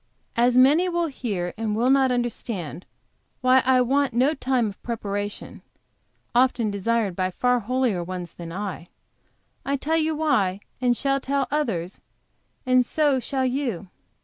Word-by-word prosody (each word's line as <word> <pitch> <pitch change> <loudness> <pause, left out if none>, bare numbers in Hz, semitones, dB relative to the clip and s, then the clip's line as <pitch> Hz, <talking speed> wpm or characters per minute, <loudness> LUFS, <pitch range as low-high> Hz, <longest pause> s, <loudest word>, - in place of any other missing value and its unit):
"As 245 +1 +3
many 295 +8 +5
will 345 -1 0
hear 205 - -3
and 215 -2 -1
will 240 +4 +2
not 270 -1 +4
understand, 230 - -3 0.5
why 255 +1 +5
I 255 -1 +5
want 270 +1 +1
no 260 +5 +3
time 260 -4 0
of, 200 -2 -6
preparation, 205 -3 -5 0.7
often 245 -3 +2
desired 200 -1 0
by 185 0 0
far 245 +6 +1
holier 240 -5 0
ones 180 -1 -6
than 170 -1 -8
I, 190 -2 -5 0.8
I 280 - -1
tell 315 +4 0
you 315 0 +1
why, 205 -12 +1 0.2
and 245 -2 +2
shall 275 0 +1
tell 275 0 -1
others, 210 - -2 0.6
and 255 0 +4
so 285 +1 +1
shall 260 +2 -1
you. 245 -8 -2
245 Hz, 145 wpm, -24 LUFS, 205-270 Hz, 0.8 s, many